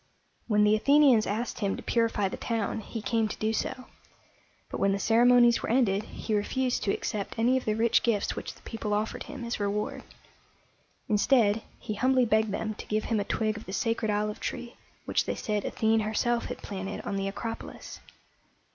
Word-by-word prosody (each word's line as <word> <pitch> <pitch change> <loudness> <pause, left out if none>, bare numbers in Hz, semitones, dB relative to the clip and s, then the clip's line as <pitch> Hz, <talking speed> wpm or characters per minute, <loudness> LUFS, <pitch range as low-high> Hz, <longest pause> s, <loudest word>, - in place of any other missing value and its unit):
When 210 -2 +3
the 210 +1 +5
Athenians 275 -1 +5
asked 225 +4 -2
him 200 -3 -1
to - - -8
purify 230 -4 +1
the - - -5
town, 225 -2 -2
he 220 0 -7
came 225 -1 +1
to 210 - -6
do 220 +1 0
so; 255 +3 -3 0.9
but - - -4
when 195 0 +3
the - - 0
ceremonies 240 +3 +5
were - - -4
ended, 220 -5 +3
he 220 - -5
refused 250 +5 0
to 200 - +1
accept 205 +1 -3
any 240 +3 +3
of 260 - -1
the 215 - +1
rich 225 +1 +3
gifts 215 -4 0
which - - -6
the - - -20
people 215 -2 -3
offered 215 +1 -2
him 275 -4 -7
as 235 - -3
reward. 205 +1 -2 1.1
Instead, 215 0 +3 0.2
he 215 - -5
humbly 255 +4 +3
begged 220 -1 +2
them 215 +2 -2
to - - -8
give 215 0 0
him 215 - +2
a - - 0
twig 215 +1 -1
of 225 - -10
the 190 - -6
sacred 225 0 0
olive 210 0 -1
tree 240 -1 -5 0.3
which - - +1
they - - -2
said 210 -2 -2
Athene 220 0 +2
herself 225 +2 0
had - - -7
planted 195 0 -5
on - - -4
the 195 0 -1
Acropolis. 225 +3 -6
220 Hz, 195 wpm, -28 LUFS, 210-235 Hz, 1.1 s, the